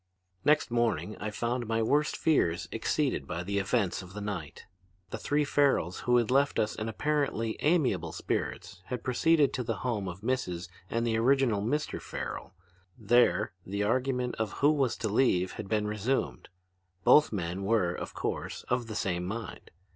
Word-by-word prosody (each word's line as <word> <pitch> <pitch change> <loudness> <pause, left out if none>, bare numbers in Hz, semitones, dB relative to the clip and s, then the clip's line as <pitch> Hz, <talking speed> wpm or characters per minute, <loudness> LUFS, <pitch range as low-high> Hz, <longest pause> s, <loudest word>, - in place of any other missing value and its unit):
"Next 150 -3 +3
morning 120 -2 0
I 110 - -4
found 120 +2 -2
my 115 0 +1
worst 150 +6 +1
fears 90 - +2
exceeded 135 +5 -1
by 90 0 -3
the 100 +2 -1
events 100 -2 0
of 95 0 -12
the 105 - -6
night. 100 -7 -5 0.5
The - - -4
three 145 0 +1
Farrels 135 - +2
who 125 - +6
had 120 -1 +1
left 140 +2 +3
us 105 0 +1
in 110 +1 -4
apparently 135 -3 -1
amiable 155 -3 +1
spirits - - -3
had 125 -2 -4
proceeded 150 +3 +3
to 125 - -2
the 115 -1 -2
home 110 -6 -1
of 90 +1 -7
Mrs. 95 -7 -2 0.2
and 115 +1 0
the 115 -1 +1
original 125 -4 +3
Mr. 145 +9 -1
Farrel. 95 - -6 0.4
There 120 -3 +3
the 100 +2 -2
argument 125 +2 0
of 110 -2 -1
who 145 +2 +3
was 135 -5 +1
to 115 - -2
leave 100 -5 +2
had 105 - -7
been 105 -1 +1
resumed. 105 - -2 0.5
Both 150 +8 +6
men 90 -2 -3
were, 95 -4 +2
of - - -7
course, - - -3
of 125 -1 0
the 110 - -6
same 90 -4 -1
mind. 110 0 -6
115 Hz, 170 wpm, -29 LUFS, 100-130 Hz, 0.5 s, who